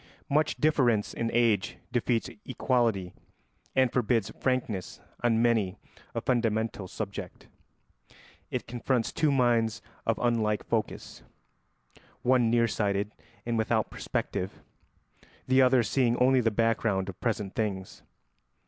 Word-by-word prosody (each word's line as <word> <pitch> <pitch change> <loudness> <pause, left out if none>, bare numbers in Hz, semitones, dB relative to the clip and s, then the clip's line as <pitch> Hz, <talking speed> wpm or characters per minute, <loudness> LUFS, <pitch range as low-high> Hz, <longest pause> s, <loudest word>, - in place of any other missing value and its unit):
Much 150 +2 +2
difference 125 -9 +2
in 115 - -2
age 115 -4 +2
defeats 120 -1 0 0.2
equality 115 -8 0 0.6
and 130 -2 +3
forbids 115 -4 +1
frankness 120 -8 -1 0.2
on 115 -1 +3
many 110 -6 +2 0.4
a - - -1
fundamental 115 -5 0
subject; 100 -2 -6 1.0
it - - -3
confronts 120 0 -1
two 155 -2 +2
minds 115 -4 +2 0.3
of 115 - +2
unlike 110 -3 +1
focus: 110 -3 -3 1.0
one 125 -2 +4
near 115 0 +3
sighted 100 -1 -1 0.3
and 115 -1 0
without 110 0 +1
perspective, 95 +1 -3 0.8
the 130 +1 +4
other 130 -1 +5
seeing 120 +2 +1
only 130 0 +4
the 115 - +2
background 110 -3 +1
of 95 - -8
present 105 -5 -1
things. 95 -4 -3
115 Hz, 115 wpm, -28 LUFS, 105-125 Hz, 1.0 s, other